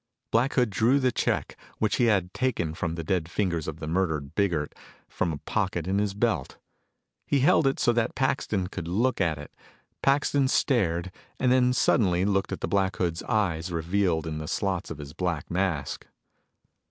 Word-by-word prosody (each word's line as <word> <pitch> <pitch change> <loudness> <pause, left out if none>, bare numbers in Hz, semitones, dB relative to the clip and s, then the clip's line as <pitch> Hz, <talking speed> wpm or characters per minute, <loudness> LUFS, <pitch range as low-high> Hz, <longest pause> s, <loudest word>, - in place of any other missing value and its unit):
Black 120 +5 +2
Hood 125 -4 +2
drew 120 +8 +3
the 130 -2 +2
check, - - -1 0.2
which 110 -1 +1
he 120 - +3
had 95 -5 +1
taken 110 -12 -1
from 85 0 -3
the 85 - -4
dead 85 -1 -1
fingers 85 -4 -1
of 80 0 -5
the 80 - -5
murdered 80 -4 -1
Biggert, 85 -7 0 0.3
from 85 - -1
a 75 - -4
pocket 90 +2 -2
in 95 +1 +1
his 100 -1 -1
belt. 105 - -1 0.7
He 140 -2 +2
held 140 +1 +4
it 135 - 0
so 120 -2 +3
that 115 -1 0
Paxton 130 -8 0
could 90 -2 -6
look 110 +7 +1
at 80 -4 +1
it. 75 - -10 0.5
Paxton 140 0 +2
stared, 95 - +1 0.3
and 125 - +3
then 125 -1 +4
suddenly 95 -7 +2
looked 95 -1 0
at - - -4
the - - -1
Black 95 +1 +1
Hood's 85 -2 -1
eyes 90 -5 -1
revealed 85 0 0
in 75 -1 -4
the 75 - -6
slots 95 -1 -1
of 80 - -6
his 70 -1 -9
black 90 -3 -3
mask. 85 -6 -2
95 Hz, 185 wpm, -27 LUFS, 80-115 Hz, 0.7 s, held